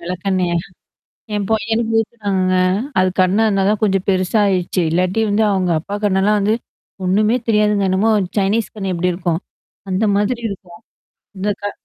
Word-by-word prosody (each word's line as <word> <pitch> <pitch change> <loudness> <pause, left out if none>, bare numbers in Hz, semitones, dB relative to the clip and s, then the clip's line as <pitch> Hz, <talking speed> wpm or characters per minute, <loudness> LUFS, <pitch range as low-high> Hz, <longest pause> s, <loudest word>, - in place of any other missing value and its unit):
வெளக்கண்ணயா 180 0 -1 0.8
என் 205 -1 -1
பையனுக்கு 225 +1 0
ஊத்துனாங்க. 200 -5 -1 0.5
அது 185 0 +3
கண்ண 185 +2 +3
இருந்தா 195 -2 +1
தான் 210 0 +1
கொஞ்சம் 195 -3 +1
பெருச 185 -1 0
ஆயிடுச்சு. 185 -2 0
இல்லாட்டி 180 +5 0
வந்து 210 +2 +2
அவங்க 185 -2 0
அப்பா 200 +5 -6
கண்ணலாம் 205 +1 +2
வந்து, 205 +2 +2 0.5
ஒண்ணுமே 210 +5 +2
தெரியாதுங்க 210 -2 +2
என்னமோ 190 +4 +2 0.3
சைனீஸ் 205 +3 +1
கண்ணு 195 -3 -3
எப்படி 180 +1 0
இருக்கும்? 170 -2 -1 0.5
அந்த 190 +4 +1
மாதிரி 235 +4 0
இருக்கும். 180 -3 -10 0.6
இந்த 200 +2 -1
கா 205 - -2
195 Hz, 145 wpm, -18 LUFS, 185-210 Hz, 0.8 s, அது